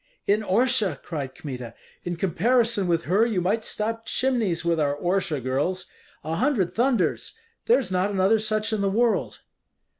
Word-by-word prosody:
"In 205 +2 +2
Orsha?" 215 - +1
cried 140 -6 -5
Kmita. 125 -5 -7 0.3
"In 175 0 -3
comparison 210 +4 +1
with 170 -1 +1
her 195 +7 +2
you 225 -5 +1
might 205 +6 0
stop 225 +1 -3
chimneys 225 -11 0
with 170 -1 +1
our 145 -1 +1
Orsha 175 -1 -1
girls! 145 +9 -1 0.4
A 160 +1 -3
hundred 235 -8 +1
thunders! 245 - 0 0.3
there's 465 - +3
not 185 +2 +1
another 200 +2 +2
such 215 0 -1
in 215 - 0
the 200 - +1
world." 230 +3 0
195 Hz, 155 wpm, -25 LUFS, 170-225 Hz, 0.4 s, there's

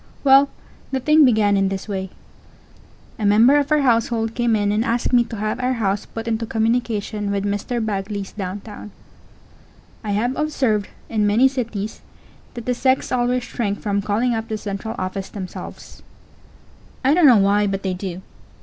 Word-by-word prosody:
Well, 275 0 +6 0.4
the 265 - -1
thing 305 +3 +5
began 215 -5 +3
in 195 -1 +2
this 195 +1 -5
way. 190 -2 -4 1.1
A - - -3
member 225 +7 +5
of 285 +1 -2
our 300 -1 +4
household 230 -3 +1
came 240 -2 +1
in 205 -1 +1
and 215 +2 +1
asked 235 +2 -1
me 240 -1 +6
to 230 - -7
have 215 +2 -2
our 255 +1 0
house 205 -4 -1
put 225 0 -7
into 230 0 -1
communication 220 -2 -1
with 200 0 -1
Mr. 210 +3 -2
Bagley's 200 -1 -3
downtown. 205 +2 -7 1.1
I 210 -2 -2
have 240 +6 0
observed, 260 -9 0 0.2
in 215 -2 0
many 225 +6 +5
cities, 230 -6 -4 0.5
that 235 -2 -7
the 250 - +1
sex 260 +2 +1
always 250 0 +1
shrink 205 -5 -3
from 200 -1 0
calling 220 +5 0
up 225 0 -3
the 220 - -3
central 205 +2 -5
office 185 +1 -4
themselves. 190 -3 -9 1.0
I 275 - +5
don't 335 -2 +6
know 245 -4 +7
why, 205 +1 +3
but 195 0 -3
they 190 -1 -1
do. 185 0 -6
220 Hz, 170 wpm, -21 LUFS, 200-245 Hz, 1.1 s, know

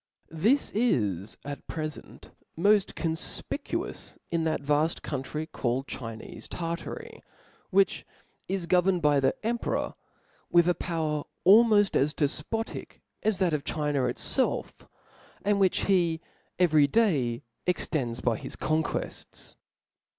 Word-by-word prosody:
This 215 - +2
is 105 - 0
at 145 0 -7
prefent 155 -1 -6 0.3
moft 200 +3 +3
coq 165 - -1 0.4
fptcuous 335 +5 -4
in 165 -1 +1
that 155 -2 0
vafl: 150 +3 +2
country 145 +3 -3
called 130 -4 -2
Chinefe 115 -5 -7
Tartary, 170 -1 -5 0.5
which 195 0 +3 0.4
is 190 -2 -2
governed 180 0 +3
by 145 -1 +5
the 135 -1 +2
emperor 235 +1 -1 0.6
with 170 0 +5
a 180 - +4
power 155 -4 -2 0.2
almoft 205 0 +6
as 150 +3 +2
dcfpotic 155 +10 -2 0.3
^s 215 -3 +2
that 180 -4 +2
of 150 -2 0
China 145 -4 0
it 125 - -2
(^If^ - - +1 0.7
and 205 0 +3
which 190 -2 +3
he 175 -4 +2 0.4
every 155 -5 +5
day 140 - +2 0.2
extends 135 -9 0
by 115 -3 +1
his - - -7
con 155 +1 +1
quefts. - - -5
160 Hz, 125 wpm, -28 LUFS, 145-195 Hz, 0.7 s, almoft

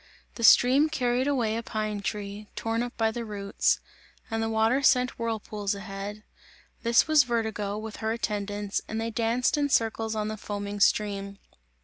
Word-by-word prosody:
The 230 - -7
stream 265 +6 +6
carried 255 -3 0
away 240 -6 +1
a 230 - -2
pine 215 -2 -3
tree, 205 0 -5
torn 225 +1 -1
up 245 0 -5
by 225 -1 +2
the 235 +1 -4
roots; 205 -2 0 0.5
and 225 0 -1
the 225 - -1
water 225 +4 +2
sent 250 -2 +3
whirlpools 215 -3 -2
ahead; 200 +1 -7 0.6
this 235 +4 +4
was 310 -2 +6
Vertigo, 220 -4 -2
with 215 0 -7
her 220 0 -2
attendants, 205 -2 -2
and 220 - -3
they 225 +1 -2
danced 235 +5 +1
in 285 -1 +1
circles 225 -2 +1
on 215 -1 -1
the 215 0 -4
foaming 205 0 -5
stream. 200 -1 +1
220 Hz, 165 wpm, -27 LUFS, 205-235 Hz, 0.6 s, stream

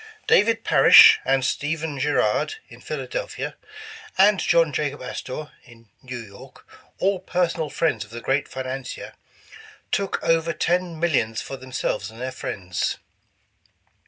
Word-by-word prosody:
' 435 - -23
' - - -35
David 225 +2 +2
Parish 135 -3 +8
and 135 -1 +1
Stephen 150 +1 -2
Girard 145 - +1
in - - -14
Philadelphia, - - -5 0.6
and 200 0 +5
John 165 -3 +2
Jacob 145 -1 -2
Astor 130 +3 -6
in 115 -2 -19
New 125 -1 -7
York, 105 -4 -13 0.3
all 195 0 +1
personal 175 -4 -1
friends 160 +3 0
of 105 - -16
the 115 +1 -7
great 135 +4 0
financier, 130 0 -6 0.8
"took 195 -1 0
over 165 0 +1
ten 175 -1 -1
millions 130 -10 0
for 135 - -6
them 130 -1 -12
selves 105 -4 -2
and 110 +1 -14
their 130 +1 -4
friends. 90 -8 -3
145 Hz, 140 wpm, -23 LUFS, 125-170 Hz, 0.8 s, Parish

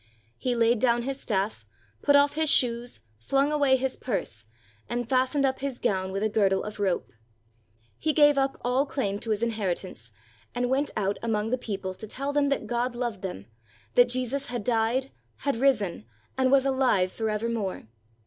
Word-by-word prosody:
He 250 -1 0
laid 235 0 +3
down 240 0 +2
his 275 +1 -4
staff, 205 -1 -1 0.4
put 285 - +4
off 285 0 +5
his 315 0 +2
shoes, 240 -2 +2 0.2
flung 275 - +1
away 285 -3 +4
his 265 0 -1
purse, 115 - -4 0.4
and 240 -1 -2
fastened 260 +2 +2
up 265 0 0
his 270 -2 -3
gown 190 -1 -1
with 195 +2 -2
a - - +3
girdle 200 -3 +2
of 210 0 -7
rope. 190 -3 -1 0.9
He 310 - +1
gave 295 -1 +5
up 270 0 0
all 255 +3 +1
claim 205 -9 -2
to 225 - -6
his 215 +1 0
inheritance 190 - -3 0.5
and 245 +1 0
went 280 +2 +1
out 200 -1 0
among 225 -1 -1
the 255 - +2
peo 210 -5 -4
ple 190 -1 -5
to 215 +4 -9
tell 275 +6 -3
them 285 -1 +2
that 275 -5 -1
God 240 +2 -1
loved 240 -5 -3
them, 140 - -6 0.5
that 245 0 +5
Jesus 255 +3 -1
had 245 -3 -4
died, 240 +4 0 0.3
had 280 -5 0
risen, 215 - +1 0.3
and 260 0 +2
was 275 -1 +5
alive 255 -9 +2
forevermore. 220 - -2
240 Hz, 180 wpm, -27 LUFS, 210-270 Hz, 0.9 s, off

